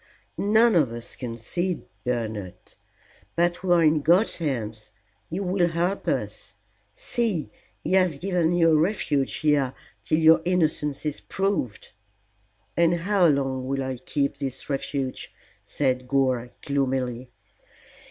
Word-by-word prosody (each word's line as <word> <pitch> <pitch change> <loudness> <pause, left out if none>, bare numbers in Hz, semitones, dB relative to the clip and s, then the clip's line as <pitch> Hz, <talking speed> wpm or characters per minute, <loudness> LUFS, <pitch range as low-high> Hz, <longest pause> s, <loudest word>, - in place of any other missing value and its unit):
"None 220 +3 +4
of 150 -9 +3
us 115 0 -6
can 115 -3 -6
see, 175 +10 -2 0.2
Bernard. 110 -6 -3 0.8
But 175 +1 +1
we 185 -1 -1
are 170 -1 +5
in 155 -1 +4
God's 175 +9 +4
hands. 110 -9 -3 0.4
He 170 - -3
will 185 -2 +1
help 175 +4 -1
us. - - -2 0.4
See, 235 - -2 0.3
He - - -1
has 185 -6 +3
given 175 0 +1
you 165 -2 +4
a - - +5
refuge 155 -6 0
here 145 -4 +1 0.3
till 155 - 0
your 160 0 +6
innocence 155 -5 0
is 150 -1 -3
proved." 195 - -2 0.8
"And 170 0 +3
how 190 -1 +3
long 135 -3 0
will 135 0 -1
I 130 -1 -3
keep 140 +3 -2
this 135 +1 -5
refuge?" 135 -1 -3 0.3
said 130 -3 -1
Gore, 130 -3 +1 0.2
gloomily. 130 -3 -1
150 Hz, 135 wpm, -25 LUFS, 130-175 Hz, 0.8 s, your